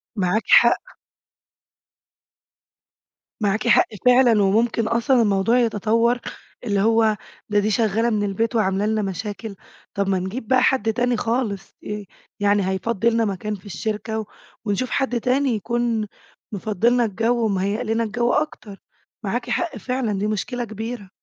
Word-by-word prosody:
معاكِ 200 +2 0
حق. - - +4 2.5
معاكِ 215 +3 0
حق - - +5 0.2
فعلًا، 245 -4 +5
وممكن 225 +3 +2
أصلًا 235 +2 +2
الموضوع 205 +3 +2
يتطوّر، 230 +1 +1 0.4
اللي 205 -4 0
هو 220 -1 +3 0.3
ده 205 - +3
دي 210 +1 0
شغالة 225 +2 +1
من 210 -2 0
البيت 225 +4 -1
وعاملة 195 -1 +1
لنا 220 0 0
مشاكل، 205 +2 -5 0.4
طب 200 -1 -1
ما 190 -1 +1
نجيب 210 +5 -5
بقى 255 -1 +4
حد 225 -5 +2
تاني 245 0 +1
خالص. 225 -4 -2 0.6
يعني 205 -1 +2
هيفضي 220 +3 0
لنا 230 0 +1
مكان 210 +1 -3
في 190 - -16
الشركة 220 +2 -3
و 215 - -4 0.4
ونشوف 220 +5 -1
حد 260 -3 0
تاني 265 +3 +1
يكون 235 0 -1 0.4
مفضي 215 +1 0
لنا 245 -1 +2
الجو 225 +3 0
ومهيئ 200 +2 -1
لنا 225 0 0
الجو 235 +3 0
أكتر. 215 -10 -3 0.4
معاكِ - - -3
حق 345 -1 -1
فعلًا، 250 -6 -2
دي 205 - 0
مشكلة 230 +4 -2
كبيرة. 220 -1 -6
220 Hz, 140 wpm, -22 LUFS, 205-235 Hz, 2.5 s, حق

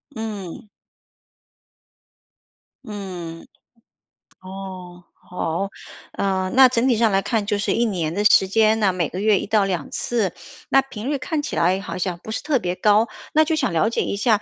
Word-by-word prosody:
嗯。 210 -4 -6 2.2
嗯， 180 -6 -7 0.9
哦， 185 -2 -9
好。 180 +2 -4 0.4
呃， 190 -1 -1
那 265 -1 +9
整 245 +1 +1
体 245 - +3
上 225 -2 +3
来 195 0 +2
看 220 -2 -1
就 205 -1 0
是 205 - 0
1 235 +1 +2
年 170 -7 -2
的 205 +2 -1
时 195 -2 +6
间 220 +2 +3
呢， 195 -3 +2
每 170 -4 -1
个 185 - -5
月 210 -2 +3
1 - - -4
到 210 -1 +2
2 180 -6 -3
次， 220 -7 -1 0.4
那 270 +1 +5
频 255 -1 -7
率 285 - 0
看 295 +3 -2
起 290 - -5
来 180 +3 +2
好 - - -6
像 180 -1 -2
不 220 - -7
是 - - -3
特 295 -4 +1
别 180 -2 -2
高。 210 +4 +3 0.3
那 315 +1 +5
就 315 +1 0
想 265 - 0
了 170 +7 +2
解 - - -1
一 - - -2
下， 210 0 +2
205 Hz, 180 characters per minute, -22 LUFS, 185-225 Hz, 2.2 s, 那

